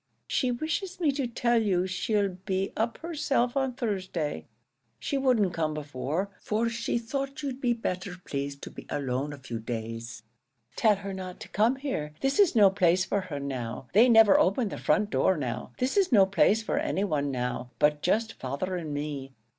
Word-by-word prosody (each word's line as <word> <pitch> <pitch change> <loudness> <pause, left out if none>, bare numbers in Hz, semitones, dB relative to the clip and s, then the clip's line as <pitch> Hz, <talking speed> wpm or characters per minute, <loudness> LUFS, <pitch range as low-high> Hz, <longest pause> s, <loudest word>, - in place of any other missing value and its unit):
She 255 - 0
wishes 325 +9 -3
me 315 -5 +3
to 275 -2 -2
tell 235 0 +2
you 185 -4 +1
she 185 +3 -1
'll 200 -1 +2
be 190 0 -1
up 225 +1 -1
herself 285 -7 0
on 265 -2 0
Thursday; 185 - -3 0.5
she 125 - -3
wouldn't 245 -9 +2
come 155 -2 -1
before, 150 +6 -3
for 225 +2 0
she 235 0 -1
thought 275 +5 -4
you'd 270 -1 -4
be 245 -2 +2
better 185 -5 -4
pleased 140 0 -4
to - - -7
be - - -11
alone 135 +1 -2
a 145 - -7
few 120 -4 -6
days." 115 0 -5 0.5
"Tell 215 -2 +4
her 200 0 -6
not 185 -1 -7
to - - -9
come 225 +5 +2
here. 205 - -4
This 270 +7 +1
is 395 -9 +5
no 205 -4 +7
place 185 -1 +3
for 200 - 0
her 165 -6 -5
now. 125 -3 -5
They 230 +6 +6
never 225 -3 +7
open 200 +4 +2
the - - -6
front 210 0 +1
door 190 - +3
now. 125 -3 -4
This 255 +1 0
is 385 -5 +3
no 200 -5 +7
place 195 +3 +3
for 260 - 0
any 295 -10 0
one 150 -7 0
now, 125 -1 -3
but 150 0 +2
just 220 +5 +1
father 140 +8 -3
and 160 -4 -5
me. 145 -2 -5
195 Hz, 195 wpm, -28 LUFS, 145-240 Hz, 0.5 s, no